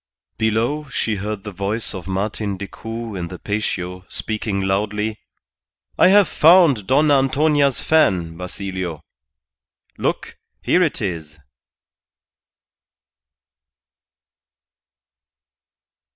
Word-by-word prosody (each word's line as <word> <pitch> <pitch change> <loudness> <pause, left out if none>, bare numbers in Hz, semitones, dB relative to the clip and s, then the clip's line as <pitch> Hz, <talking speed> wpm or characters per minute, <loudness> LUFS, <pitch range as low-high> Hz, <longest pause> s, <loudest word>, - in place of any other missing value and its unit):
Below 115 +7 0
she 110 -5 -1
heard 105 0 -4
the 105 - -6
voice 100 +4 -3
of 95 -2 -7
Martin 100 +1 -2
Decoud 110 +3 -7
in 85 -1 -4
the 90 - -8
patio 90 -3 -3
speaking 110 -2 -3
loudly: 105 +3 -1 0.8
"I - - +5
have 200 +1 +6
found 155 - +5
Dona 145 +2 +4
Antonia's 140 0 +2
fan, 90 - +2
Basilio. 90 -2 -5 1.0
Look, - - -2 0.3
here 180 - +3
it 155 -9 0
is!" 80 -6 -5
105 Hz, 90 wpm, -20 LUFS, 95-135 Hz, 1.0 s, have